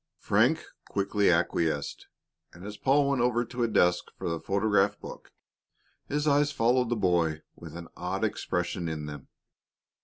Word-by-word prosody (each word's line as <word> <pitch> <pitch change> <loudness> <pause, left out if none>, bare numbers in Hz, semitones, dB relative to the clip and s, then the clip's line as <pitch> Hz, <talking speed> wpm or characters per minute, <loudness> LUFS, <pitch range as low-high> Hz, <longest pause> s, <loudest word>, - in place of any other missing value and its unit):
Frank - - +2 0.2
quickly 100 +1 +1
acquiesced, 85 -3 0 0.5
and 90 +2 -12
as 105 0 -6
Paul 140 +4 +2
went 135 -3 +1
over 120 0 +1
to 120 +1 -6
a 120 - +3
desk 90 -5 +2
for - - -3
the 85 -1 -2
photograph 100 +1 +1
book, - - -10 0.8
his 150 +1 -1
eyes 145 0 +3
followed 125 -2 +2
the 120 - +1
boy 85 -6 +1
with - - -10
an 85 -1 -8
odd 95 +3 -3
expression 90 -4 -2
in 75 -2 -4
them. 75 -2 -8
100 Hz, 155 wpm, -28 LUFS, 85-120 Hz, 0.8 s, a